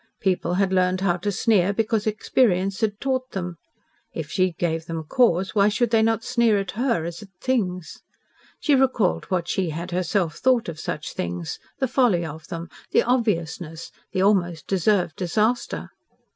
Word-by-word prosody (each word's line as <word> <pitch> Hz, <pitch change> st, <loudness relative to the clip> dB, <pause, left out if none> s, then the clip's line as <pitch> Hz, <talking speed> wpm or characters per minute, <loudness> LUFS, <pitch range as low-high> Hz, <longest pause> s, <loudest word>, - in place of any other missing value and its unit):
People 185 Hz, -2 st, 0 dB
had 190 Hz, 0 st, +1 dB
learned 185 Hz, 0 st, +2 dB
how 180 Hz, -2 st, +2 dB
to 205 Hz, +4 st, -2 dB
sneer 200 Hz, -2 st, +2 dB
because 220 Hz, 0 st, 0 dB
experience 195 Hz, -3 st, +1 dB
had 210 Hz, -2 st, 0 dB
taught 260 Hz, -1 st, -2 dB
them. 180 Hz, -3 st, -4 dB, 0.6 s
If 155 Hz, -2 st, -5 dB
she 185 Hz, -1 st, +1 dB
gave 165 Hz, -1 st, -2 dB
them 165 Hz, -2 st, -4 dB
cause, 190 Hz, 0 st, +2 dB
why 205 Hz, -1 st, +4 dB
should 235 Hz, +2 st, 0 dB
they 225 Hz, -1 st, +4 dB
not 225 Hz, 0 st, +1 dB
sneer 235 Hz, -4 st, +3 dB
at 195 Hz, -2 st, -3 dB
her 230 Hz, -6 st, 0 dB
as 170 Hz, +2 st, -6 dB
at 210 Hz, -, -12 dB
things? 185 Hz, -10 st, -2 dB, 0.6 s
She 295 Hz, -, +2 dB
recalled 260 Hz, -8 st, +2 dB
what 180 Hz, -3 st, -1 dB
she 185 Hz, -2 st, 0 dB
had 170 Hz, +4 st, -5 dB
herself 175 Hz, -2 st, 0 dB
thought 255 Hz, -3 st, +2 dB
of 160 Hz, -2 st, -6 dB
such 150 Hz, -2 st, -4 dB
things 85 Hz, -1 st, -4 dB, 0.2 s
the 265 Hz, -, 0 dB
folly 230 Hz, -9 st, +2 dB
of 155 Hz, 0 st, -8 dB
them, 170 Hz, -2 st, -6 dB, 0.2 s
the -, -, +3 dB
obviousness 170 Hz, -9 st, -1 dB, 0.2 s
the 185 Hz, -, +1 dB
almost 175 Hz, -6 st, +2 dB
deserved 190 Hz, -3 st, +1 dB
disaster. 215 Hz, +7 st, -1 dB
190 Hz, 170 wpm, -24 LUFS, 170-225 Hz, 0.6 s, why